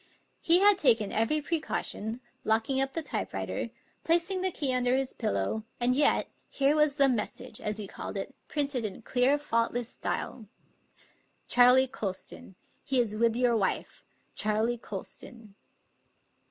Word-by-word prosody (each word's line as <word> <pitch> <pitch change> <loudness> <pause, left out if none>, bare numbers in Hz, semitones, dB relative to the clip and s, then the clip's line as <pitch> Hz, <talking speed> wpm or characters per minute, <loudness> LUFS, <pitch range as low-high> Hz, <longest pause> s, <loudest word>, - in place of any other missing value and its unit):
He 340 +2 +5
had 405 -1 +6
taken 225 - +3
every 225 +8 +1
precaution, 255 -7 -3 0.2
locking 225 +5 +1
up 270 0 -1
the 330 - -2
typewriter, - - -3 0.3
placing 345 +3 +1
the 375 - +1
key 285 -7 -1
under 250 0 +2
his 265 -1 -1
pillow; 100 - -2 0.2
and 245 +1 +2
yet, 290 +1 +3 0.2
here 280 +2 +2
was 300 -2 +3
the 280 -2 +5
message, 220 -3 -3
as 210 0 -2
he 210 - -5
called - - -7
it, - - -5
printed 280 -5 -1
in 215 +1 -5
clear, 255 +5 +2
faultless 235 -3 -1
style: 225 -3 -4 1.0
Charley 250 +2 +6
Colston. 195 -5 -6 0.3
He 265 -1 +1
is 220 -3 0
with 230 +1 +2
your 245 -1 +2
wife 200 -4 -2 0.3
Charley 220 +3 +1
Colston." 210 +1 -8
245 Hz, 140 wpm, -29 LUFS, 220-285 Hz, 1.0 s, had